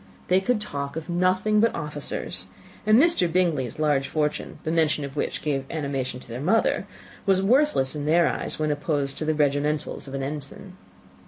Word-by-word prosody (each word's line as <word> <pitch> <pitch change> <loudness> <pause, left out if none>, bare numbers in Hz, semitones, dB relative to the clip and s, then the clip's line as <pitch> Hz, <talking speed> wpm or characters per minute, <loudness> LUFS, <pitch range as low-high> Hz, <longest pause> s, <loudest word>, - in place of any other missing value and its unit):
They 185 +1 +4
could 240 +3 +1
talk 140 -9 -4
of 160 +2 -6
nothing 185 +4 +2
but 230 +2 +3
officers; 150 -2 -4 0.4
and 215 +1 +7
Mr. 280 - +4
Bingley's 160 -9 +1
large 145 -3 +1
fortune, 150 -1 -2
the 160 - -1
mention 155 -3 +1
of 140 0 -9
which - - -2
gave 140 -3 0
animation 140 -5 -3
to - - -15
their 120 +2 -6
mother, 215 +3 +2 0.4
was 190 -1 +3
worthless 245 - +3
in 145 0 -3
their 165 +1 +4
eyes - - -2
when 155 -1 0
opposed 145 -2 -1
to 155 - -2
the 155 0 +1
regimentals 150 0 0
of 135 - -6
an 135 - -3
ensign. 150 +6 -7
155 Hz, 180 wpm, -25 LUFS, 140-185 Hz, 0.4 s, and